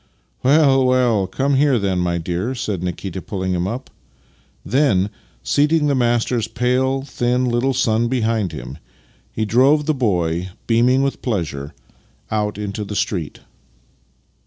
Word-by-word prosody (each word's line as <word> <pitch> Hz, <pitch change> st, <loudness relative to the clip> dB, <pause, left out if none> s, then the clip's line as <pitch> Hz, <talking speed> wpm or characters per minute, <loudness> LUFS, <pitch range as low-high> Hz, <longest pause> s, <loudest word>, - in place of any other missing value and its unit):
" -, -, -43 dB
Well, 135 Hz, -1 st, +4 dB
well! 125 Hz, -6 st, +2 dB
Come 135 Hz, +9 st, 0 dB
here 140 Hz, -1 st, +3 dB
then, 95 Hz, -4 st, 0 dB
my 90 Hz, -1 st, 0 dB
dear," 90 Hz, +9 st, -3 dB
said 105 Hz, -7 st, -3 dB
Nikita, 90 Hz, +1 st, -4 dB
pulling 95 Hz, -2 st, -3 dB
up. 125 Hz, +6 st, -5 dB, 0.7 s
Then, 115 Hz, -8 st, +2 dB, 0.3 s
seating 150 Hz, +1 st, +2 dB
his 140 Hz, -, +2 dB
master's 120 Hz, -2 st, +1 dB
pale, 125 Hz, +3 st, 0 dB
thin 125 Hz, -2 st, 0 dB
little 125 Hz, +2 st, 0 dB
son 115 Hz, -2 st, +2 dB
behind 115 Hz, -6 st, 0 dB
him, 65 Hz, -1 st, -8 dB, 0.5 s
he 110 Hz, -, -2 dB
drove 135 Hz, +7 st, +3 dB
the 155 Hz, -, +2 dB
boy, 90 Hz, -, 0 dB, 0.2 s
beaming 125 Hz, +3 st, +3 dB
with 140 Hz, -, -2 dB
pleasure, 80 Hz, -, -3 dB, 0.6 s
out 105 Hz, -1 st, -1 dB
into 105 Hz, 0 st, -4 dB
the 105 Hz, 0 st, -6 dB
street. 90 Hz, -7 st, -2 dB
115 Hz, 135 wpm, -20 LUFS, 95-130 Hz, 0.7 s, Well